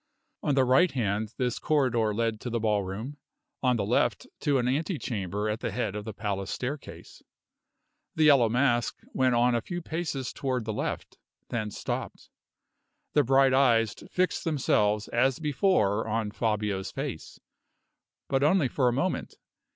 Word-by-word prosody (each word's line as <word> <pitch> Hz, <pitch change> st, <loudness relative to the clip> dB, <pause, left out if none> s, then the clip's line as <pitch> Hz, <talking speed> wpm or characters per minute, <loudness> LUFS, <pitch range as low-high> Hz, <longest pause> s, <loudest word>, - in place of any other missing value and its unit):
On 145 Hz, -, +1 dB
the 135 Hz, -, +4 dB
right 130 Hz, +8 st, +5 dB
hand 110 Hz, -3 st, -2 dB
this 125 Hz, -2 st, -1 dB
corridor 125 Hz, -7 st, +1 dB
led 115 Hz, 0 st, -1 dB
to 125 Hz, -, -4 dB
the 115 Hz, 0 st, -1 dB
ballroom; 105 Hz, +5 st, -2 dB, 0.4 s
on 125 Hz, -2 st, +3 dB
the 105 Hz, -4 st, -1 dB
left -, -, +1 dB
to 145 Hz, -2 st, +2 dB
an 125 Hz, -1 st, 0 dB
ante 155 Hz, +7 st, 0 dB
chamber 105 Hz, -5 st, -3 dB
at 105 Hz, +1 st, -2 dB
the -, -, -2 dB
head 120 Hz, -5 st, -2 dB
of 105 Hz, 0 st, -5 dB
the 110 Hz, -, -4 dB
palace 100 Hz, -2 st, -3 dB
staircase. 135 Hz, +4 st, -6 dB, 0.9 s
The 160 Hz, -, +2 dB
Yellow 140 Hz, -7 st, +6 dB
Mask 120 Hz, 0 st, +1 dB, 0.2 s
went 130 Hz, -2 st, +2 dB
on 120 Hz, +1 st, +3 dB
a 120 Hz, -, +1 dB
few 175 Hz, +8 st, -5 dB
paces 160 Hz, -6 st, -4 dB
toward 130 Hz, -4 st, -2 dB
the 110 Hz, -, -2 dB
left, -, -, -4 dB, 0.3 s
then 110 Hz, -3 st, -2 dB
stopped. -, -, -5 dB, 0.8 s
The 145 Hz, -, +4 dB
bright 135 Hz, +1 st, +4 dB
eyes 115 Hz, -5 st, +4 dB, 0.2 s
fixed 185 Hz, 0 st, 0 dB
themselves 105 Hz, -, +1 dB
as 125 Hz, +2 st, +2 dB
before 140 Hz, -, +1 dB
on 110 Hz, -1 st, -1 dB
Fabio's 105 Hz, -3 st, -1 dB
face, -, -, -6 dB, 0.9 s
but 135 Hz, 0 st, +1 dB
only 150 Hz, -1 st, +3 dB
for 130 Hz, +1 st, +1 dB
a -, -, +4 dB
moment. 140 Hz, +9 st, -2 dB
120 Hz, 160 wpm, -28 LUFS, 110-135 Hz, 0.9 s, Yellow